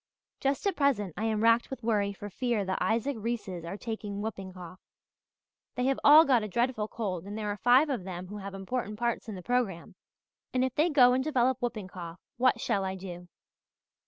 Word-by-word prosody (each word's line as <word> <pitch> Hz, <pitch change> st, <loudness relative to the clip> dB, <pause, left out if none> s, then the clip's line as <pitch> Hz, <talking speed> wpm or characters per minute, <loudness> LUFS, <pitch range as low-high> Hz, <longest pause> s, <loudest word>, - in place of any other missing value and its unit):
Just 275 Hz, +4 st, -1 dB
at 395 Hz, -3 st, +1 dB
present 245 Hz, -, +1 dB
I 215 Hz, -, -2 dB
am 220 Hz, -1 st, 0 dB
racked 230 Hz, +1 st, +4 dB
with 260 Hz, -3 st, -7 dB
worry 210 Hz, -3 st, +1 dB
for 205 Hz, +1 st, -8 dB
fear 235 Hz, -2 st, -1 dB
the 190 Hz, 0 st, -1 dB
Isaac 230 Hz, +5 st, 0 dB
Reeses 210 Hz, -6 st, -4 dB
are 170 Hz, +4 st, -5 dB
taking 210 Hz, -3 st, -5 dB
whooping 200 Hz, -3 st, -5 dB
cough. 180 Hz, 0 st, -10 dB, 1.0 s
They 250 Hz, 0 st, 0 dB
have 270 Hz, 0 st, +1 dB
all 305 Hz, +3 st, +9 dB
got 255 Hz, -5 st, +4 dB
a 215 Hz, -, -3 dB
dreadful 235 Hz, +1 st, 0 dB
cold 190 Hz, -7 st, -4 dB
and 205 Hz, +1 st, -6 dB
there 210 Hz, -1 st, -2 dB
are 205 Hz, -, -4 dB
five 250 Hz, +7 st, +5 dB
of 255 Hz, -9 st, -2 dB
them 180 Hz, -1 st, -6 dB
who 205 Hz, +3 st, -8 dB
have 200 Hz, -1 st, -7 dB
important 210 Hz, +2 st, -4 dB
parts 235 Hz, 0 st, -2 dB
in 210 Hz, -, -5 dB
the 180 Hz, -, -9 dB
programme 230 Hz, -8 st, -1 dB, 0.6 s
and 255 Hz, 0 st, +3 dB
if 260 Hz, -, -3 dB
they 305 Hz, +6 st, +2 dB
go 250 Hz, -5 st, +6 dB
and 260 Hz, +1 st, +1 dB
develop 260 Hz, -3 st, +1 dB
whooping 220 Hz, -6 st, -3 dB
cough 175 Hz, -2 st, -8 dB, 0.2 s
what 255 Hz, +1 st, +3 dB
shall 205 Hz, -5 st, 0 dB
I 190 Hz, 0 st, -2 dB
do? 180 Hz, -2 st, -8 dB
220 Hz, 210 wpm, -29 LUFS, 195-250 Hz, 1.0 s, all